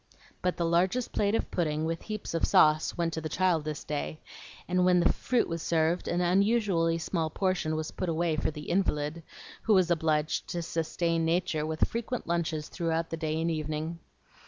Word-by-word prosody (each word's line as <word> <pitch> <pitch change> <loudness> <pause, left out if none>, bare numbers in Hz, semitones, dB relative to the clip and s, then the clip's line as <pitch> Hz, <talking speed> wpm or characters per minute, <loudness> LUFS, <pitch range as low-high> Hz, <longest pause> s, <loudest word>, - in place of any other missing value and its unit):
But 180 0 0
the 170 - 0
largest 180 +9 +1
plate 205 +1 +1
of - - -2
pudding, 155 -3 0
with 165 +1 -2
"heaps 215 -4 -5
of 165 - -1
sauce," 155 +2 +4
went 170 -1 0
to 160 - -3
the 155 - -4
child 180 -4 +2
this 155 -1 -4
day, 150 +1 -4 0.5
and 180 +1 +2
when 180 0 +5
the 170 - +3
fruit 250 -2 0
was 165 -1 -3
served, 165 +2 +1
an 175 +1 0
unusually 185 -2 +2
small 165 -1 -1
portion 180 -2 0
was 155 0 -3
put 185 - -3
away 165 0 +1
for 155 - 0
the 150 -1 -8
invalid, 165 -4 0 0.4
who 215 - +3
was 180 -2 +3
obliged 155 -2 +1
to 175 -2 -3
sustain 165 0 -1
nature 165 -2 0
with 160 0 +1
frequent 235 +1 -3
lunches 165 -3 -1
through 165 -2 -1
the - - -1
day 160 -1 -2
and 165 +1 0
evening. 155 +1 -3
165 Hz, 190 wpm, -29 LUFS, 155-180 Hz, 0.5 s, when